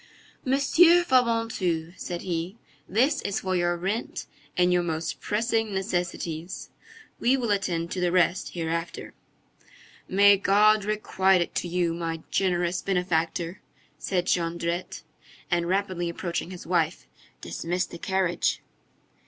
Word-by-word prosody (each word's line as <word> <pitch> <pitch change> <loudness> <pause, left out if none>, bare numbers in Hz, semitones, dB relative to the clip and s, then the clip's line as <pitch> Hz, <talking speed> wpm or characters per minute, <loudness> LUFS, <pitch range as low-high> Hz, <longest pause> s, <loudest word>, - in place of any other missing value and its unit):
"Monsieur 330 +6 +5
Fabantou," 230 - +1
said 175 -2 -5
he, 175 +3 -3 0.3
"this 250 - +2
is 200 - -2
for 185 -1 -1
your 175 -1 +1
rent 195 +7 -3 0.3
and 180 0 +4
your 180 - +3
most 165 -1 -3
pressing 225 -1 0
necessities. 175 -3 -3 0.5
We 255 +3 +3
will 235 -4 -1
attend 170 -4 -1
to 185 - -2
the 175 -1 +2
rest 180 0 +1
hereafter." 165 0 -4 0.9
"May 200 +1 +6
God 210 +1 +4
requite 190 -3 +2
it 175 - -3
to - - -2
you, 175 -1 0
my 165 -1 -4
generous 180 -2 +1
benefactor!" 175 -1 -1 0.4
said 180 -2 -1
Jondrette. 170 0 -1 0.5
And 170 -1 +1
rapidly 185 -3 0
approaching 170 0 -3
his 180 -2 -9
wife:— 170 -2 0 0.3
"Dismiss 180 +2 -2
the 170 - -10
carriage!" 190 -2 0
180 Hz, 125 wpm, -26 LUFS, 170-200 Hz, 0.9 s, May